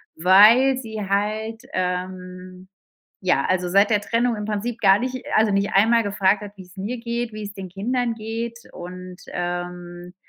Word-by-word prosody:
weil 215 +10 +6
sie 220 -4 -6
halt, 215 +3 -2
ähm 185 0 -5 0.6
ja, 185 - +2
also 180 -1 0
seit 200 +3 +4
der 210 -2 +3
Trennung 235 +2 0
im 210 - -5
Prinzip 215 +3 -3
gar 195 -1 +5
nicht 255 0 -4
also, 215 0 +4
nicht 200 +1 0
einmal 230 +4 +4
gefragt 200 0 +1
hat, 205 - -8
wie's 185 0 -14
mir 215 +6 -4
geht, 235 0 -3
wie's 210 -2 -7
den 190 -2 -7
Kindern 235 +6 -2
geht 230 +1 -5
und, 180 +1 -9 0.2
ähm, 175 0 -5
205 Hz, 160 wpm, -22 LUFS, 185-225 Hz, 0.6 s, weil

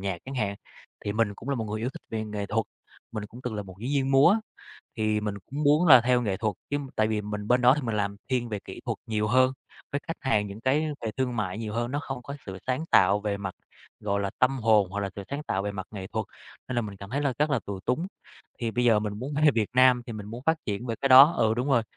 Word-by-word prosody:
nhạc 95 -3 -2
chẳng 135 - -7
hạn. 105 -5 -1 0.5
Thì 100 - -1
mình 110 -2 +1
cũng 125 - -10
là 140 - +1
một 115 - -2
người 110 0 -4
yêu 120 - -1
thích - - -11
về 110 -1 -2
nghệ 105 -1 -4
thuật, 110 +1 -1 0.5
mình 105 -2 -4
cũng 120 +4 -12
từng 125 -3 -3
là 105 - -3
một 95 -2 -12
diễn 125 - -3
viên 135 -2 +1
múa 145 +10 +6 0.6
thì 110 -1 +1
mình 105 -1 -2
cũng 145 +3 -4
muốn 150 +5 +4
là 130 -5 +10
theo 125 +1 +2
nghệ 100 -4 -1
thuật 105 -1 -1 0.2
chứ. 145 - +1 0.2
Tại 110 0 +3
vì 110 -1 0
mình 105 0 -5
bên 125 0 +4
đó 125 +2 +6
thì 150 - -3
mình 115 -3 -2
làm 100 -1 -1
thiên 125 -2 0
về 105 - -3
kỹ - - -9
thuật - - -2
nhiều 105 -1 0
hơn 130 +3 +4 0.4
với 140 - -1
khách 165 - -4
hàng, 110 -7 +1
những 100 +2 -8
cái 145 +5 +2 0.2
về 110 - -2
thương 125 -2 -1
mại 105 -1 -2
nhiều 110 -2 -4
hơn. 120 +1 -1
Nó 145 - -1
không 130 -2 -5
có 140 - -7
sự 95 -1 -6
sáng 130 +5 -1
tạo 100 +2 +5
về 105 -1 -1
mặt, 95 -2 -5 0.5
gọi 100 -1 -1
là, 100 -1 -1
tâm 130 +1 +3
hồn 110 -5 +3
hoặc 100 +2 -3
là 100 -1 -2
sự 100 - -5
sáng 145 +2 -3
tạo 95 -8 -1
về 105 - -3
mặt 95 -2 -6
nghệ 95 -3 -6
thuật. - - -3 0.4
Nên 130 - -3
là 120 - +2
mình 105 -2 -7
cảm 100 +1 -10
thấy 140 - -1
là 140 -2 +1
rất 150 +1 +2
là 130 -6 +1
tù 100 -2 -5
túng. 155 - -1 0.5
Thì 115 -2 -1
bây 120 +2 0
giờ 115 -3 +5
mình 105 -1 -2
muốn 135 +4 -5
về 150 - +8
Việt 110 -3 +1
Nam 125 -1 +5
thì 115 - -6
mình 105 -2 -7
muốn 115 +4 -8
phát 160 0 +4
triển 105 +4 -3
về 115 - -1
cái 135 - +1
đó. 135 +5 +10
Ừ, 110 -1 +3
đúng 125 +4 -1
rồi, 120 -4 +4
115 Hz, 285 wpm, -27 LUFS, 105-130 Hz, 0.6 s, là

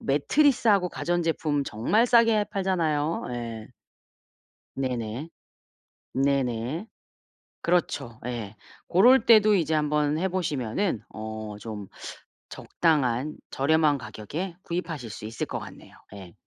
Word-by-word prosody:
매트리스하고 205 - +3
가전제품 165 -4 0
정말 205 - +1
싸게 230 -3 +4
팔잖아요. 165 -5 0
예. 115 -1 -6 1.1
네네. 125 +2 -3 0.8
네네. 135 - 0 0.8
그렇죠. 145 -9 -1
예. 115 -4 -5 0.3
고럴 245 +9 +5
때도 215 -2 +7
이제 160 -3 +1
한번 150 0 +1
해보시면은 170 - -1
어 110 +1 -6 0.2
좀 105 -3 -7 0.6
적당한 150 -3 0 0.2
저렴한 150 +1 +3
가격에 135 - -6
구입하실 165 -8 -4
수 105 - -8
있을 110 +1 -4
것 - - -4
같네요. - - -12 0.2
예. 95 -3 -11
150 Hz, 230 characters per minute, -26 LUFS, 120-180 Hz, 1.1 s, 때도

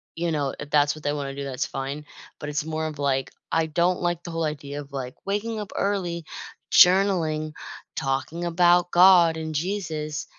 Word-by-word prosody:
you 170 0 -1
know, 145 -3 -1
if 150 0 -8
that's 145 0 +3
what 155 - -12
they 145 - 0
wanna 140 -2 -4
do, 140 - -5
that's 135 -2 -3
fine, 135 +2 -5 0.3
but 150 - -5
it's 150 +1 -2
more 160 0 -2
of, 155 - -7
like, 135 -2 0 0.2
I 165 0 +2
don't 175 +3 +1
like 175 -1 -1
the 170 - -7
whole 165 0 -1
idea 145 -1 -4
of, 140 - -14
like, 130 -2 -5
waking 215 +2 -2
up 205 - -6
early, 180 -5 -1 0.5
journaling, 180 -5 +4 0.4
talking 135 +6 -2
about 175 +1 +4
God 175 -2 +6
and 160 -1 -4
Jesus, 155 -3 -3
160 Hz, 185 wpm, -25 LUFS, 145-175 Hz, 0.5 s, God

